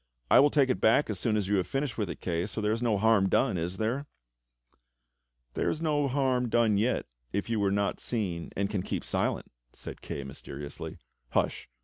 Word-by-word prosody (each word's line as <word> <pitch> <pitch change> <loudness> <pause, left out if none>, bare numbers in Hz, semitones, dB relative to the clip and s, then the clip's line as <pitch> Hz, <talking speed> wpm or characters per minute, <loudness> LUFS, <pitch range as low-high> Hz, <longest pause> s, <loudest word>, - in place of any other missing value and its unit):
"I - - +8
will 145 - +6
take 140 -3 +3
it - - -2
back 115 +3 +4
as 100 - -3
soon 110 -2 +1
as 100 -3 -1
you 100 0 +2
have 95 - 0
finished 135 -2 -2
with 105 -5 -2
it, - - -6
Kay, 85 +1 -1
so 110 - -5
there 105 0 +1
is 115 +2 -1
no 115 -4 +2
harm 105 -2 +4
done, - - +2
is 90 +2 -3
there.?*" 125 +6 -1 1.5
"There - - 0
is 155 - -2
no 150 -3 +1
harm 130 -2 +1
done 110 -3 +3
yet 120 +4 +1 0.3
if 100 - -2
you 110 - +1
were 100 -1 +2
not 100 0 0
seen 95 -8 -3
and 100 +1 +1
can 100 -2 -2
keep - - -3
silent," - - -1 0.2
said - - -9
Kay 70 - -5
mysteriously. 70 +2 -7 0.4
"Hush! - - 0
110 Hz, 210 wpm, -29 LUFS, 95-125 Hz, 1.5 s, I